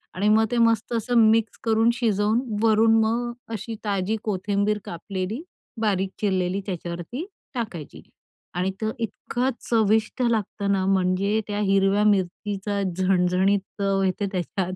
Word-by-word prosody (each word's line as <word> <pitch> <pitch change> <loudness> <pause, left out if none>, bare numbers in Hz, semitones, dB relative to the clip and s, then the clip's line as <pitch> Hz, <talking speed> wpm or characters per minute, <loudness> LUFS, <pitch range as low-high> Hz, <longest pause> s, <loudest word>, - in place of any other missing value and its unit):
आणि 200 +3 0
मग 220 +1 +5
ते 245 - 0
मस्त 230 0 +2
असं 235 +2 0
मिक्स 225 0 0
करून 225 0 +3
शिजवून 220 -1 +1 0.2
वरून 225 0 +5
मग 240 +2 -1 0.2
अशी 225 +2 -5
ताजी 200 +1 0
कोथिंबीर 205 +1 0
कापलेली, 185 - -4 0.4
बारीक 195 -3 +1
चिरलेली 190 -1 0
त्याच्यावरती 175 - -5 0.3
टाकायची 190 - -5 0.5
आणि 185 +2 0
तो 220 - 0
इतकं 240 +3 -2 0.2
चविष्ट 220 +1 +2
लागतं 210 -3 0
ना, 190 -1 +1
म्हणजे 195 +2 +2
त्या 205 0 -2
हिरव्या 195 +1 +3
मिरचीचा 200 +1 0 0.2
झणझणीत 185 +1 +2 0.2
चव 195 -1 +1
येते 190 +2 0
त्याच्यात. 185 +1 -2
205 Hz, 130 wpm, -24 LUFS, 190-220 Hz, 0.5 s, मग